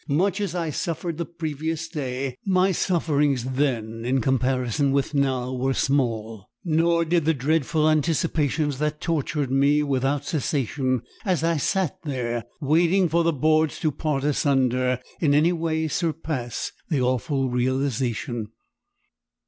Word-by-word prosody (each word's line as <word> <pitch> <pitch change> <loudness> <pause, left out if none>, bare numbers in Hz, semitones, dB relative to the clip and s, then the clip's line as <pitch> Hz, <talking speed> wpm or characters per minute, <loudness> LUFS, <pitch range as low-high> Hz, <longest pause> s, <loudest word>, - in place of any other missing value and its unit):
Much 190 +7 +1
as 190 -4 -2
I 165 -3 -1
suffered 165 +2 -3
the 170 - -2
previous 160 0 -4
day, 135 -5 -3
my 190 0 +3
sufferings 150 -7 +1
then 120 -4 -1
in 130 +2 +1
comparison 130 +1 +1
with 140 +2 0
now 130 -3 0
were 130 +1 0
small, 115 -7 -1 0.2
nor 170 +1 +2
did 170 0 +2
the 160 0 +3
dreadful 155 +3 +1
anticipations 155 -2 +1
that 150 0 -1
tortured 150 -4 -1
me 140 +2 +3
without 140 0 0
cessation 130 -4 -1 0.2
as 185 -6 0
I 165 -1 +2
sat 180 +2 0
there, 120 -6 -3
waiting 170 +5 +3
for 170 +2 +2
the 165 - +3
boards 155 +1 +2
to 155 - +1
part 145 -1 -2
asunder, 130 -3 +1 0.2
in 145 -4 +3
any 160 +4 +4
way 160 -1 -1
surpass 155 -6 -2 0.2
the 150 -5 +1
awful 130 +1 0
realisation. 125 -3 -1
145 Hz, 135 wpm, -24 LUFS, 130-160 Hz, 0.2 s, any